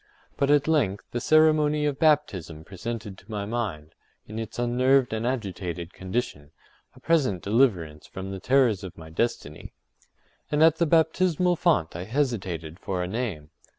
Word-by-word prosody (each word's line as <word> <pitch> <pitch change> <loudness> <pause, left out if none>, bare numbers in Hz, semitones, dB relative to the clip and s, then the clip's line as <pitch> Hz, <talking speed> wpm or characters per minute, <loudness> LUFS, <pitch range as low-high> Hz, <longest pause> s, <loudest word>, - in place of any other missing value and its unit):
But 140 - 0
at 145 0 +4
length 120 -12 +1
the 120 - -3
ceremony 155 -1 +4
of 145 -2 -1
baptism 95 - +1
presented 105 +2 -6
to 95 - -22
my 105 -2 -3
mind, 100 -9 -4 0.3
in 110 +1 -7
its 115 - -6
unnerved 125 +1 +2
and 110 +2 -1
agitated 95 -8 -4
condition, 95 - -4 0.5
a - - -15
present 130 - +1
deliverance 100 - +1
from 95 +1 -7
the 95 - -5
terrors 120 -3 +2
of 95 - -8
my 80 -1 -11
destiny. 80 -6 -3 0.8
And 150 +1 +3
at 160 0 +5
the 170 - +2
baptismal 175 +2 +2
font 125 - +1
I 90 +1 -5
hesitated 95 - -2
for 90 -3 -3
a - - -3
name. 95 -8 -4
115 Hz, 155 wpm, -26 LUFS, 90-145 Hz, 0.8 s, at